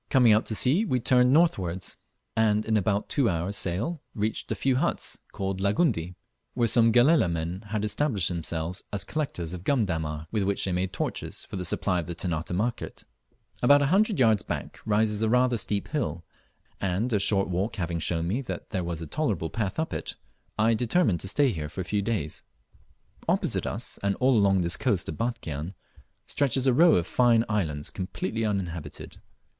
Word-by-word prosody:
Coming 125 Hz, -5 st, +5 dB
out 110 Hz, -, +2 dB
to 110 Hz, -, -2 dB
sea 140 Hz, -, +3 dB
we 130 Hz, -, 0 dB
turned 125 Hz, +1 st, +4 dB
northwards, 95 Hz, -, +1 dB, 0.4 s
and 110 Hz, -1 st, +2 dB
in 110 Hz, -, +1 dB
about 100 Hz, 0 st, +1 dB
two 135 Hz, -6 st, +2 dB
hours' 85 Hz, +4 st, -2 dB
sail 105 Hz, -, -2 dB
reached 110 Hz, +1 st, -2 dB
a -, -, +1 dB
few 130 Hz, -2 st, +1 dB
huts, 170 Hz, +6 st, -2 dB
called 95 Hz, -1 st, -3 dB
Langundi, 100 Hz, -, +1 dB, 0.4 s
where 120 Hz, -, +2 dB
some 115 Hz, 0 st, +4 dB
Galela 120 Hz, -, +4 dB
men 85 Hz, +3 st, -3 dB
had 105 Hz, 0 st, -2 dB
established 105 Hz, -, 0 dB
themselves 85 Hz, 0 st, -3 dB
as 100 Hz, -, -2 dB
collectors 90 Hz, -, -4 dB
of 90 Hz, -1 st, -7 dB
gum 125 Hz, -1 st, +2 dB
dammar, 80 Hz, -3 st, -3 dB
with 110 Hz, -, 0 dB
which 100 Hz, 0 st, 0 dB
they 95 Hz, -, -1 dB
made 90 Hz, +1 st, -1 dB
torches 100 Hz, -, -4 dB
for -, -, -8 dB
the 90 Hz, -, -3 dB
supply 90 Hz, +1 st, 0 dB
of 85 Hz, -, -5 dB
the 85 Hz, -, -5 dB
Ternate 85 Hz, -1 st, -3 dB
market. 115 Hz, +7 st, -3 dB, 0.6 s
About 145 Hz, +3 st, +6 dB
a 140 Hz, +5 st, +1 dB
hundred 210 Hz, +1 st, +3 dB
yards 110 Hz, -5 st, +4 dB
back -, -, -5 dB
rises 105 Hz, 0 st, +1 dB
a 110 Hz, -, +2 dB
rather 125 Hz, +1 st, +3 dB
steep 105 Hz, -1 st, -2 dB
hill, 85 Hz, -, -2 dB, 0.6 s
and 100 Hz, +6 st, -1 dB
a 105 Hz, -, +3 dB
short 100 Hz, 0 st, +3 dB
walk 95 Hz, +4 st, -2 dB
having 85 Hz, -3 st, -2 dB
shown 80 Hz, +1 st, 0 dB
me 110 Hz, +9 st, -1 dB
that 130 Hz, -, -7 dB
there 95 Hz, -4 st, -1 dB
was 85 Hz, -1 st, -4 dB
a -, -, -5 dB
tolerable 90 Hz, -, -2 dB
path 105 Hz, -4 st, -2 dB
up 160 Hz, 0 st, -2 dB
it, -, -, -4 dB, 0.4 s
I 110 Hz, +2 st, +3 dB
determined 115 Hz, -, +1 dB
to -, -, -4 dB
stay 140 Hz, +6 st, +3 dB
here 75 Hz, -5 st, -4 dB
for 95 Hz, -, -5 dB
a -, -, -5 dB
few 105 Hz, +2 st, 0 dB
days. 100 Hz, -8 st, -2 dB, 0.9 s
Opposite -, -, +1 dB
us, -, -, -5 dB
and 100 Hz, 0 st, 0 dB
all 130 Hz, 0 st, +3 dB
along 100 Hz, -3 st, +4 dB
this 85 Hz, 0 st, 0 dB
coast -, -, 0 dB
of 80 Hz, -, -5 dB
Batchian, 95 Hz, -, -3 dB, 0.5 s
stretches 135 Hz, -2 st, +1 dB
a 130 Hz, -, +4 dB
row 165 Hz, +5 st, +6 dB
of 85 Hz, -, +1 dB
fine 120 Hz, +1 st, +3 dB
islands 80 Hz, -9 st, -2 dB
completely 105 Hz, +4 st, -3 dB
uninhabited. 95 Hz, -6 st, -4 dB
105 Hz, 190 wpm, -27 LUFS, 90-120 Hz, 0.9 s, About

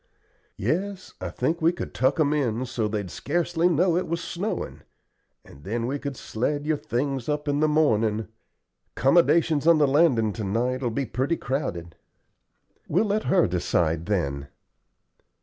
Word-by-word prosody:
"Yes, 190 Hz, +3 st, -2 dB
I -, -, -3 dB
think 170 Hz, +2 st, -1 dB
we 165 Hz, +1 st, +4 dB
could 175 Hz, -, -6 dB
tuck 130 Hz, +5 st, +1 dB
'em 150 Hz, -1 st, +3 dB
in 130 Hz, -4 st, 0 dB
so 120 Hz, -3 st, -2 dB
they'd 105 Hz, -4 st, -3 dB
scarcely 175 Hz, +2 st, 0 dB
know 170 Hz, +1 st, +2 dB
it 180 Hz, -, 0 dB
was 170 Hz, +1 st, -2 dB
snowin', 185 Hz, +5 st, -4 dB, 0.6 s
and 70 Hz, -, -15 dB
then 115 Hz, +5 st, -2 dB
we 140 Hz, +4 st, -2 dB
could 140 Hz, -2 st, -5 dB
sled 145 Hz, +6 st, -2 dB
your 155 Hz, -1 st, +1 dB
things 135 Hz, +1 st, -2 dB
up 150 Hz, 0 st, -2 dB
in 145 Hz, 0 st, +1 dB
the 155 Hz, -, +3 dB
mornin'. 110 Hz, -8 st, +2 dB, 0.7 s
'Commodations 160 Hz, +1 st, +3 dB
on 170 Hz, -1 st, +7 dB
the 150 Hz, -2 st, +4 dB
landin' 135 Hz, -7 st, +3 dB
to 110 Hz, -, -5 dB
night 120 Hz, +6 st, -1 dB
will 125 Hz, -, 0 dB
be 135 Hz, +4 st, -2 dB
pretty 130 Hz, +8 st, -1 dB
crowded." 90 Hz, -, -3 dB, 0.9 s
"We'll 190 Hz, +8 st, +2 dB
let 210 Hz, +1 st, 0 dB
her 185 Hz, -2 st, +4 dB
decide, 85 Hz, -2 st, 0 dB
then." 70 Hz, -9 st, -1 dB
140 Hz, 160 wpm, -25 LUFS, 110-165 Hz, 0.9 s, on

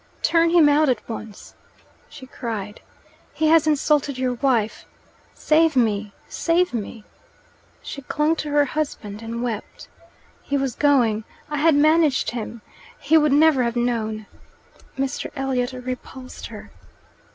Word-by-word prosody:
"Turn 330 Hz, 0 st, +3 dB
him 335 Hz, -3 st, +5 dB
out 295 Hz, 0 st, +4 dB
at 250 Hz, -, -1 dB
once!" 220 Hz, -2 st, -8 dB, 0.6 s
she 295 Hz, -3 st, -11 dB
cried. 215 Hz, -5 st, -6 dB, 0.5 s
"He 310 Hz, 0 st, +2 dB
has 320 Hz, -1 st, +5 dB
insulted 295 Hz, -2 st, +1 dB
your 255 Hz, -1 st, 0 dB
wife. 240 Hz, -4 st, 0 dB, 0.5 s
Save 320 Hz, 0 st, +3 dB
me, 215 Hz, -4 st, +1 dB, 0.2 s
save 350 Hz, 0 st, 0 dB
me!" 225 Hz, -1 st, -5 dB, 0.8 s
She 280 Hz, -, -7 dB
clung 300 Hz, +4 st, 0 dB
to 305 Hz, -, -4 dB
her 290 Hz, 0 st, +3 dB
husband 250 Hz, -8 st, -4 dB
and 230 Hz, +1 st, -5 dB
wept. 225 Hz, -3 st, -6 dB, 0.5 s
"He 280 Hz, -, -2 dB
was 270 Hz, -3 st, -1 dB
going 240 Hz, -6 st, +2 dB, 0.3 s
I 295 Hz, -, -1 dB
had 310 Hz, +1 st, +4 dB
managed 310 Hz, -1 st, +3 dB
him 235 Hz, -1 st, -6 dB, 0.4 s
he 300 Hz, +3 st, +2 dB
would 300 Hz, -2 st, +4 dB
never 295 Hz, -1 st, +5 dB
have 235 Hz, -1 st, -1 dB
known 225 Hz, -3 st, -1 dB, 0.4 s
" -, -, -28 dB
Mr. 275 Hz, +1 st, -2 dB
Elliot 265 Hz, -2 st, -1 dB
repulsed 255 Hz, 0 st, -7 dB
her. -, -, -11 dB
270 Hz, 140 wpm, -22 LUFS, 235-300 Hz, 0.8 s, him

